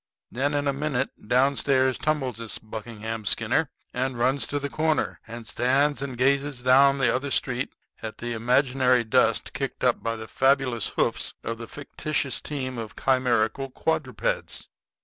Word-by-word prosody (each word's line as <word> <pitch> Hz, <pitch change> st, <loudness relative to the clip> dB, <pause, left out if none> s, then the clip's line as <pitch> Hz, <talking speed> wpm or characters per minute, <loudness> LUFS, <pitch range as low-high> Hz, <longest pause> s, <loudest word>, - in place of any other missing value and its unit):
Then 145 Hz, +4 st, 0 dB
in 145 Hz, 0 st, 0 dB
a 140 Hz, -, +2 dB
minute 140 Hz, -2 st, -1 dB, 0.2 s
downstairs 130 Hz, +1 st, +3 dB
tumbles 140 Hz, -7 st, -1 dB
this 115 Hz, -2 st, -5 dB
Buckingham 110 Hz, 0 st, -6 dB
Skinner, 120 Hz, +9 st, +1 dB, 0.2 s
and 130 Hz, 0 st, -1 dB
runs 130 Hz, +3 st, +1 dB
to 145 Hz, -, -2 dB
the 140 Hz, 0 st, -2 dB
corner, 155 Hz, +2 st, 0 dB
and 115 Hz, 0 st, -8 dB
stands 135 Hz, +6 st, +2 dB
and 135 Hz, -3 st, -4 dB
gazes 135 Hz, 0 st, +1 dB
down 135 Hz, +2 st, +6 dB
the 130 Hz, -4 st, +3 dB
other 130 Hz, +3 st, -1 dB
street 125 Hz, -1 st, -1 dB, 0.3 s
at 110 Hz, -1 st, -6 dB
the 120 Hz, 0 st, -4 dB
imaginary 125 Hz, +1 st, +3 dB
dust 110 Hz, -, +2 dB
kicked -, -, -4 dB
up -, -, +3 dB
by 115 Hz, 0 st, -1 dB
the 110 Hz, -1 st, -7 dB
fabulous 135 Hz, -3 st, +2 dB
hoofs -, -, 0 dB
of 115 Hz, 0 st, -4 dB
the 115 Hz, -, -7 dB
fictitious 145 Hz, -2 st, -2 dB
team 130 Hz, -4 st, -4 dB
of 110 Hz, -2 st, -7 dB
chimerical 130 Hz, 0 st, +1 dB
quadrupeds. 485 Hz, -, -1 dB
130 Hz, 155 wpm, -26 LUFS, 120-140 Hz, 0.3 s, down